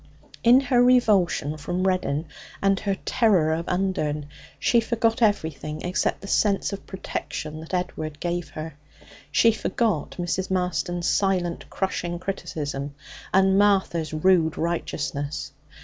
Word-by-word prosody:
In 245 Hz, +3 st, +7 dB
her 250 Hz, -2 st, +3 dB
revulsion 205 Hz, -11 st, +3 dB
from 175 Hz, +5 st, -2 dB
Reddin 180 Hz, -5 st, 0 dB, 0.3 s
and 195 Hz, -1 st, +2 dB
her 200 Hz, -1 st, -1 dB
terror 185 Hz, -10 st, +3 dB
of 165 Hz, +2 st, -3 dB
Undern, 180 Hz, -6 st, -1 dB, 0.3 s
she 235 Hz, -, +3 dB
forgot 230 Hz, 0 st, 0 dB
everything 160 Hz, -, 0 dB
except 180 Hz, +1 st, 0 dB
the 195 Hz, -, -8 dB
sense 200 Hz, 0 st, +1 dB
of 200 Hz, -, -7 dB
protection 155 Hz, -4 st, -5 dB
that 160 Hz, -, -10 dB
Edward 155 Hz, -4 st, -3 dB
gave 175 Hz, 0 st, -2 dB
her. 155 Hz, 0 st, -7 dB, 0.6 s
She 230 Hz, +9 st, +5 dB
forgot 220 Hz, -5 st, -1 dB
Mrs. 180 Hz, +2 st, -2 dB
Marston's 180 Hz, -1 st, -1 dB
silent, 185 Hz, -3 st, 0 dB
crushing 175 Hz, -2 st, -2 dB
criticism 145 Hz, -6 st, -4 dB, 0.4 s
and 190 Hz, 0 st, +4 dB
Martha's 190 Hz, -6 st, +2 dB
rude 160 Hz, 0 st, +3 dB
righteousness. 145 Hz, -4 st, -3 dB
180 Hz, 125 wpm, -25 LUFS, 160-195 Hz, 0.6 s, In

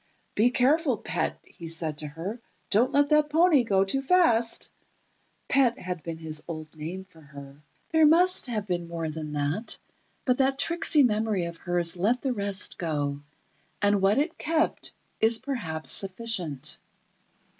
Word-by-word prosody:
"Be 225 Hz, +4 st, +3 dB
careful, 265 Hz, +1 st, +2 dB
pet," -, -, -2 dB
he 170 Hz, -, -11 dB
said 160 Hz, -2 st, -2 dB
to 150 Hz, -, -5 dB
her; 175 Hz, +10 st, -6 dB, 0.3 s
"Don't 230 Hz, +5 st, +3 dB
let 285 Hz, 0 st, +3 dB
that 300 Hz, -1 st, +3 dB
pony 320 Hz, -3 st, +4 dB
go 195 Hz, -4 st, +2 dB
too 270 Hz, +8 st, -1 dB
fast." 265 Hz, -8 st, +2 dB, 0.8 s
Pet 260 Hz, -3 st, +3 dB
had 180 Hz, -6 st, -5 dB
been 165 Hz, +1 st, -6 dB
his 155 Hz, -1 st, -5 dB
old 155 Hz, -2 st, -7 dB
name 165 Hz, +5 st, -6 dB
for 180 Hz, -4 st, -20 dB
her. 140 Hz, -1 st, -13 dB, 0.3 s
There 320 Hz, -1 st, +5 dB
must 355 Hz, +1 st, +4 dB
have 215 Hz, -4 st, -3 dB
been 175 Hz, -3 st, -3 dB
more 165 Hz, -2 st, -4 dB
than 155 Hz, -1 st, -6 dB
that, 145 Hz, +10 st, -2 dB, 0.5 s
but 250 Hz, 0 st, +1 dB
that 270 Hz, 0 st, +2 dB
tricksy 310 Hz, 0 st, +4 dB
memory 215 Hz, -5 st, +1 dB
of 170 Hz, 0 st, -7 dB
hers 175 Hz, 0 st, +1 dB
let 225 Hz, +8 st, +1 dB
the 265 Hz, -2 st, 0 dB
rest 200 Hz, -3 st, -1 dB
go, 145 Hz, -4 st, -2 dB, 0.6 s
and 205 Hz, -1 st, +2 dB
what 195 Hz, +4 st, +3 dB
it 305 Hz, +4 st, -1 dB
kept 320 Hz, +1 st, -1 dB, 0.3 s
is 225 Hz, +1 st, +5 dB
perhaps 225 Hz, -, -4 dB
sufficient. 185 Hz, -, -1 dB
200 Hz, 155 wpm, -27 LUFS, 165-260 Hz, 0.8 s, There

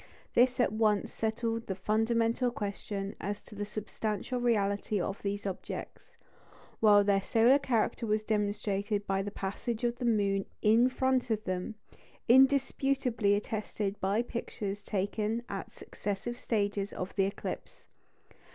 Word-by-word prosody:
This 250 Hz, +1 st, +4 dB
at 245 Hz, -, +3 dB
once 215 Hz, -2 st, +1 dB
settled 225 Hz, +1 st, -2 dB
the 190 Hz, -, -2 dB
fundamental 230 Hz, +5 st, +1 dB
question 200 Hz, -2 st, -4 dB
as 205 Hz, +1 st, -3 dB
to -, -, -15 dB
the 205 Hz, 0 st, -4 dB
substantial 215 Hz, +3 st, -3 dB
reality 205 Hz, -3 st, +1 dB
of 195 Hz, +3 st, -3 dB
these 200 Hz, 0 st, -3 dB
objects; 190 Hz, -2 st, -6 dB, 0.6 s
while 205 Hz, -2 st, +6 dB
their 200 Hz, -1 st, +3 dB
solar 235 Hz, +7 st, +4 dB
character 235 Hz, -3 st, 0 dB
was 215 Hz, 0 st, +1 dB
demonstrated 205 Hz, -1 st, -1 dB
by 195 Hz, -1 st, 0 dB
the 200 Hz, -, -3 dB
passage 210 Hz, +4 st, -4 dB
of 240 Hz, 0 st, 0 dB
the 250 Hz, -, -2 dB
moon 200 Hz, -4 st, +2 dB, 0.2 s
in 230 Hz, +4 st, +5 dB
front 260 Hz, -1 st, +1 dB
of 215 Hz, -1 st, 0 dB
them, 185 Hz, +3 st, -3 dB, 0.5 s
indisputably 265 Hz, -4 st, +4 dB
attested 210 Hz, -1 st, -3 dB
by 200 Hz, +5 st, +1 dB
pictures 205 Hz, -4 st, -4 dB
taken 210 Hz, +3 st, -1 dB
at -, -, -5 dB
successive 205 Hz, +4 st, -4 dB
stages 205 Hz, -2 st, -1 dB
of 185 Hz, +1 st, -5 dB
the 195 Hz, -, +3 dB
eclipse. 200 Hz, -, -6 dB
215 Hz, 135 wpm, -31 LUFS, 200-235 Hz, 0.6 s, while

